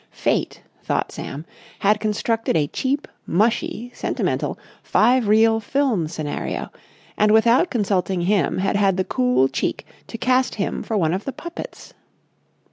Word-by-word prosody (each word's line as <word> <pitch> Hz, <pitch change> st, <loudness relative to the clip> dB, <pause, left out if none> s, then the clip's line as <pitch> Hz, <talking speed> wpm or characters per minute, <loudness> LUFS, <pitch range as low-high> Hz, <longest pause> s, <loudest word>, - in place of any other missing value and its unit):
Fate, -, -, -1 dB, 0.2 s
thought -, -, -1 dB
Sam, 150 Hz, +4 st, -7 dB, 0.3 s
had 210 Hz, +1 st, +2 dB
constructed 215 Hz, -1 st, 0 dB
a 150 Hz, -, +2 dB
cheap, 275 Hz, -, -2 dB, 0.2 s
mushy, 225 Hz, +4 st, 0 dB
sentimental, -, -, -2 dB, 0.2 s
five 240 Hz, +1 st, +3 dB
reel 225 Hz, +1 st, +4 dB
film 225 Hz, -, 0 dB
scenario, 155 Hz, -2 st, -4 dB, 0.5 s
and 210 Hz, 0 st, +4 dB
without 235 Hz, +9 st, +4 dB
consulting 195 Hz, -5 st, 0 dB
him 190 Hz, +1 st, +1 dB
had 195 Hz, +2 st, 0 dB
had 195 Hz, -2 st, +2 dB
the 185 Hz, -, +1 dB
cool 250 Hz, -, +2 dB
cheek -, -, -3 dB, 0.2 s
to 230 Hz, -, -7 dB
cast 255 Hz, +2 st, +1 dB
him 200 Hz, -, -2 dB
for 220 Hz, -, -2 dB
one 165 Hz, -4 st, +1 dB
of 190 Hz, +3 st, -3 dB
the 275 Hz, -, -2 dB
puppets. 340 Hz, +6 st, -9 dB
215 Hz, 140 wpm, -22 LUFS, 190-245 Hz, 0.5 s, reel